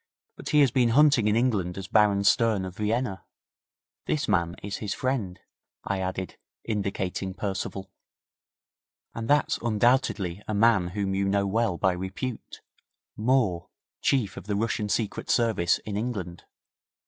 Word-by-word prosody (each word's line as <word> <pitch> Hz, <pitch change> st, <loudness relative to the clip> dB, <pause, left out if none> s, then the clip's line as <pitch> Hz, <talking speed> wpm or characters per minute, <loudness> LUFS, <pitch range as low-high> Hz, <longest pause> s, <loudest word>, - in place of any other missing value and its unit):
'But -, -, -8 dB
he 150 Hz, -1 st, +5 dB
has 135 Hz, -4 st, +4 dB
been 120 Hz, -1 st, +3 dB
hunting 145 Hz, -7 st, +5 dB
in 105 Hz, -, +2 dB
England 105 Hz, -8 st, 0 dB
as 95 Hz, -1 st, -6 dB
Baron 105 Hz, -1 st, +3 dB
Stern, 105 Hz, -1 st, +3 dB
of 90 Hz, 0 st, -7 dB
Vienna. 105 Hz, -1 st, -1 dB, 0.8 s
This 150 Hz, -1 st, 0 dB
man 85 Hz, -4 st, +1 dB
is 100 Hz, 0 st, -4 dB
his 105 Hz, -2 st, -4 dB
friend,' 120 Hz, -9 st, -2 dB, 0.4 s
I 100 Hz, -1 st, -2 dB
added, 95 Hz, 0 st, -4 dB, 0.3 s
indicating 95 Hz, -3 st, -3 dB
Percival. 95 Hz, -1 st, -4 dB, 1.2 s
'And 115 Hz, -1 st, -5 dB
that's 145 Hz, +2 st, +2 dB
undoubtedly 110 Hz, -5 st, +1 dB
a 110 Hz, -, -2 dB
man 105 Hz, -4 st, +4 dB
whom 100 Hz, -1 st, 0 dB
you 100 Hz, 0 st, 0 dB
know 100 Hz, 0 st, +1 dB
well 100 Hz, -2 st, 0 dB
by 95 Hz, 0 st, +2 dB
repute 95 Hz, +7 st, -6 dB, 0.5 s
Moore, 110 Hz, -7 st, +1 dB, 0.3 s
Chief 115 Hz, -9 st, +1 dB
of -, -, -9 dB
the 105 Hz, -, -1 dB
Russian 105 Hz, 0 st, -1 dB
Secret 105 Hz, +1 st, -2 dB
Service 110 Hz, -8 st, +2 dB
in 105 Hz, -, -4 dB
England. 100 Hz, -6 st, -4 dB
105 Hz, 145 wpm, -26 LUFS, 95-115 Hz, 1.2 s, he